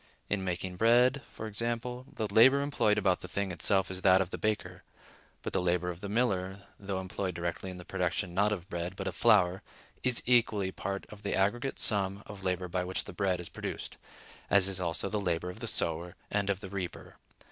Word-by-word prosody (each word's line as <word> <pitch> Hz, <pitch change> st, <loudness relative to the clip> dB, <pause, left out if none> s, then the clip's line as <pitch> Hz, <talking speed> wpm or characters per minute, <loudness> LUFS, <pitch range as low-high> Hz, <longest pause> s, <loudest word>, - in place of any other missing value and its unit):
In 100 Hz, -2 st, 0 dB
making 90 Hz, 0 st, -3 dB
bread, 120 Hz, +5 st, +4 dB
for 110 Hz, -, -8 dB
example, 120 Hz, +3 st, -3 dB
the 110 Hz, -, -3 dB
labor 130 Hz, +6 st, +7 dB
employed 110 Hz, -7 st, +2 dB
about 95 Hz, -3 st, +2 dB
the -, -, -7 dB
thing 100 Hz, +1 st, -2 dB
itself 95 Hz, +3 st, +2 dB
is 95 Hz, 0 st, -2 dB
that 95 Hz, 0 st, +6 dB
of 95 Hz, -1 st, -1 dB
the -, -, -3 dB
baker; 110 Hz, -1 st, -2 dB, 0.6 s
but -, -, -4 dB
the -, -, +2 dB
labor 90 Hz, 0 st, +1 dB
of 85 Hz, +1 st, -10 dB
the 100 Hz, -, -5 dB
miller, 100 Hz, -4 st, 0 dB, 0.2 s
though 100 Hz, -1 st, -3 dB
employed 95 Hz, -1 st, -3 dB
directly 85 Hz, +2 st, -3 dB
in 90 Hz, -, -7 dB
the 90 Hz, -, -10 dB
production 90 Hz, -2 st, -1 dB
not 100 Hz, +3 st, +3 dB
of 95 Hz, -4 st, -3 dB
bread 85 Hz, 0 st, -4 dB
but -, -, -5 dB
of -, -, -2 dB
flour, 95 Hz, -2 st, +4 dB, 0.4 s
is 125 Hz, -2 st, +2 dB
equally 115 Hz, -6 st, +3 dB
part 100 Hz, +1 st, -4 dB
of 105 Hz, -1 st, -11 dB
the 100 Hz, -, -1 dB
aggregate 120 Hz, +7 st, 0 dB
sum 100 Hz, -1 st, +2 dB
of 100 Hz, -2 st, -10 dB
labor 90 Hz, -1 st, -1 dB
by 90 Hz, +1 st, -1 dB
which 90 Hz, +1 st, -2 dB
the -, -, -9 dB
bread 90 Hz, -1 st, 0 dB
is 90 Hz, -, -6 dB
produced; -, -, -6 dB, 0.5 s
as 100 Hz, -2 st, +5 dB
is 95 Hz, -1 st, -2 dB
also 85 Hz, +1 st, 0 dB
the 105 Hz, +1 st, -1 dB
labor 90 Hz, -1 st, -1 dB
of -, -, -12 dB
the -, -, -4 dB
sower, 85 Hz, +2 st, +1 dB, 0.2 s
and 100 Hz, -1 st, 0 dB
of 95 Hz, -1 st, 0 dB
the 100 Hz, -, -7 dB
reaper. 95 Hz, -4 st, -6 dB
95 Hz, 210 wpm, -31 LUFS, 90-105 Hz, 0.6 s, labor